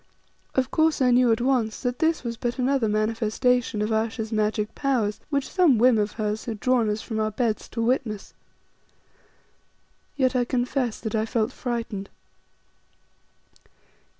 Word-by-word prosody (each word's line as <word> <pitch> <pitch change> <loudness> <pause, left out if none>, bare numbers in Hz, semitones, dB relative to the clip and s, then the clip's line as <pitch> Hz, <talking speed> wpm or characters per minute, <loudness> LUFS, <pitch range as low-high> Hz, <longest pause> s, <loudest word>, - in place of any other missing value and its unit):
Of 260 0 +1
course 315 -1 +2
I 255 -2 +4
knew 245 -1 +5
at 225 - +1
once 245 -4 0
that 245 -1 -2
this 320 0 +1
was 235 -1 -3
but 240 +2 -3
another 260 -2 +1
manifestation 220 +1 +1
of 215 - -2
Ayesha's 220 0 -1
magic 215 -1 0
powers, 235 -7 0
which 280 -2 -1
some 345 -10 +4
whim 240 0 +5
of 210 0 -1
hers 215 0 -3
had 225 -4 -5
drawn 245 -3 +2
us 210 +1 -2
from 220 -2 -4
our 215 0 +1
beds 220 0 -2
to 230 - -3
witness. 230 -4 -1 1.8
Yet 260 -2 +2
I 250 - +3
confess 245 -1 -1
that 220 - -4
I 220 0 0
felt 225 +1 0
frightened. 230 -6 -4
235 Hz, 150 wpm, -25 LUFS, 215-255 Hz, 1.8 s, knew